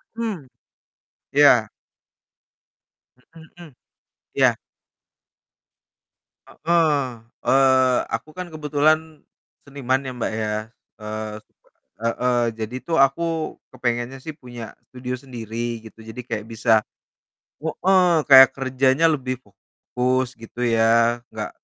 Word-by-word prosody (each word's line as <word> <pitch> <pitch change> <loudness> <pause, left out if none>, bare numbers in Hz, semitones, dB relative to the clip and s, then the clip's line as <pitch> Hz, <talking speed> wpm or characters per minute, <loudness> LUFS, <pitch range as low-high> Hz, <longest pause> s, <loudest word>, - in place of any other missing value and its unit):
Mmm, 215 - -4 0.9
iya. 135 -6 +6 1.7
Mhm. 160 -2 -15 0.6
Iya. - - +4 1.9
Heeh, 150 -7 0 0.3
eee, 130 -1 +4
aku - - -3
kan 180 -1 -5
kebetulan 155 0 +2 0.7
seniman 135 -2 -1
ya, - - -3
Mbak 120 - -2
ya. 105 -1 -1 0.4
eee, 110 0 -5 0.7
heeh. 120 +1 +1 0.2
Jadi 110 +3 -4
tuh 165 -1 +1
aku, 135 +5 +3 0.5
kepengennya 120 +1 -2
sih 155 - -5
punya 120 -6 -9 0.2
studio 125 0 -6
sendiri 120 -2 -5
gitu, 110 - -14
jadi 110 +3 -7
kayak 105 - -3
bisa 115 0 -1 0.9
heeh, 180 +3 +2 0.2
kayak 130 -1 +10
kerjanya 135 +3 +2
lebih 130 -4 -2
fokus 125 +6 -3
gitu 115 +1 -11
ya. 115 0 +3
Nggak - - -5
130 Hz, 95 wpm, -22 LUFS, 115-145 Hz, 1.9 s, kayak